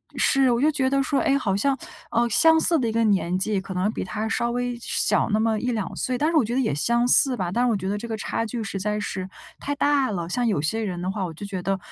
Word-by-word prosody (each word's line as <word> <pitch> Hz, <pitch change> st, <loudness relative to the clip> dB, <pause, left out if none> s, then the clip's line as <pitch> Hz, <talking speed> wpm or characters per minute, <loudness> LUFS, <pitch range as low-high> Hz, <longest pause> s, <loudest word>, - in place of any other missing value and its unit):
是， 270 Hz, -2 st, +3 dB
我 235 Hz, 0 st, 0 dB
就 305 Hz, +2 st, +3 dB
觉 265 Hz, -3 st, 0 dB
得 275 Hz, 0 st, +1 dB
说， 275 Hz, -, 0 dB
哎， 275 Hz, -, +2 dB
好 200 Hz, -8 st, -1 dB
像， 270 Hz, +7 st, 0 dB, 0.3 s
呃， 235 Hz, 0 st, +1 dB
相 320 Hz, +8 st, +6 dB
似 335 Hz, -1 st, +4 dB
的 245 Hz, -, -1 dB
一 220 Hz, -, -2 dB
个 230 Hz, 0 st, +1 dB
年 185 Hz, -4 st, +1 dB
纪， 200 Hz, +1 st, 0 dB
可 190 Hz, 0 st, -8 dB
能 185 Hz, +3 st, -1 dB
比 -, -, -5 dB
他 215 Hz, +3 st, -4 dB
稍 235 Hz, +1 st, -1 dB
微 245 Hz, 0 st, -2 dB
小 235 Hz, -, +1 dB
那 215 Hz, -, +1 dB
么 220 Hz, -1 st, 0 dB
1-2 230 Hz, -4 st, -3 dB
岁， 255 Hz, -1 st, -1 dB
但 300 Hz, +5 st, +1 dB
是 330 Hz, -, +2 dB
我 275 Hz, -, +3 dB
觉 235 Hz, +3 st, -3 dB
得 265 Hz, -, +1 dB
也 230 Hz, -, -1 dB
相 235 Hz, +11 st, +2 dB
似 250 Hz, +1 st, +6 dB
吧， 180 Hz, -5 st, -3 dB
但 240 Hz, +6 st, 0 dB
是 -, -, +2 dB
我 225 Hz, -, +1 dB
觉 190 Hz, -1 st, -4 dB
得 205 Hz, -, -2 dB
这 235 Hz, +3 st, -7 dB
个 225 Hz, -, -4 dB
差 225 Hz, +1 st, -3 dB
距 230 Hz, +1 st, -5 dB
实 200 Hz, -2 st, -5 dB
在 210 Hz, +2 st, -2 dB
是 190 Hz, -2 st, -5 dB, 0.3 s
太 285 Hz, -, -4 dB
大 285 Hz, -2 st, +1 dB
了。 175 Hz, -5 st, -4 dB
像 245 Hz, +5 st, 0 dB
有 200 Hz, -9 st, 0 dB
些 220 Hz, +9 st, 0 dB
人 185 Hz, -5 st, -4 dB
的 185 Hz, +1 st, -2 dB
话， 195 Hz, -1 st, -3 dB
我 170 Hz, -, -7 dB
就 180 Hz, +6 st, -9 dB
觉 195 Hz, -2 st, -5 dB
得 195 Hz, +2 st, -1 dB
225 Hz, 305 characters per minute, -23 LUFS, 195-250 Hz, 0.3 s, 相